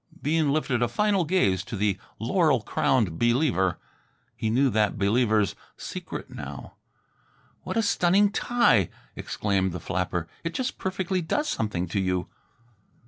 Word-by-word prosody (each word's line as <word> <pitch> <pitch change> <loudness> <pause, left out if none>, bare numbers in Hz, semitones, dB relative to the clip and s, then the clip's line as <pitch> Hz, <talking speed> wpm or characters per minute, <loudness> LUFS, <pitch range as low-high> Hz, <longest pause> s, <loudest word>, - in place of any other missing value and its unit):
Bean 155 -1 +1
lifted 135 -5 0
a 120 - +3
final 195 - +1
gaze 100 - +2
to 110 - -6
the 100 -1 0 0.2
laurel 145 - +2
crowned 105 -5 +1
Believer. 120 - +2 0.6
He 110 - -2
knew 130 +4 +3
that 105 -1 +1
Believer's 105 0 +2 0.2
secret - - -7
now. - - -8 0.9
"What - - -4
a 225 - +3
stunning 200 +1 +3
tie," 215 - +3 0.3
exclaimed 95 -3 -1
the 90 - -4
flapper. 90 -1 -2 0.2
"It 165 0 -4
just 260 0 -2
perfectly 190 -1 -1
does 295 - -1
something 105 -5 -1
to 100 - -1
you." 90 -1 -1
120 Hz, 140 wpm, -26 LUFS, -, 0.9 s, a